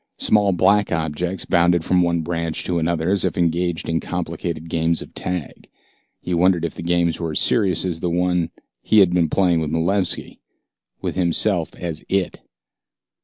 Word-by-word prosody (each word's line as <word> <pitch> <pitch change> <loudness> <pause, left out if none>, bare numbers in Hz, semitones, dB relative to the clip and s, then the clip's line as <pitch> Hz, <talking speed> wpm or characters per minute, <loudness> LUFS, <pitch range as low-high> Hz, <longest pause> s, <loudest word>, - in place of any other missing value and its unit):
Small 105 -2 +2
black 100 +3 +2
objects 80 +4 -2
bounded 85 -1 +2
from 90 -1 +3
one 85 -1 +1
branch 85 -1 -3
to 85 -2 -1
another 85 +1 0
as 100 -2 +2
if - - -1
engaged 85 0 0
in 80 0 0
complicated 85 -2 -4
games 80 0 0
of - - -16
tag. 90 -5 -5 0.5
He 90 - -4
wondered 85 -1 +2
if 85 - -4
the - - -8
games 85 -1 0
were 85 -3 -3
as - - +1
serious 95 -6 +3
as 85 -3 -2
the 90 - -2
one 90 0 0 0.3
he 110 - +2
had 95 -4 +6
been 85 -3 +2
playing 90 -1 +2
with 80 -2 -2
Malevski, 90 +5 0 0.6
with - - -2
himself 90 0 0
as 85 -3 -6
It. 95 -2 -1
85 Hz, 170 wpm, -21 LUFS, 80-90 Hz, 0.6 s, had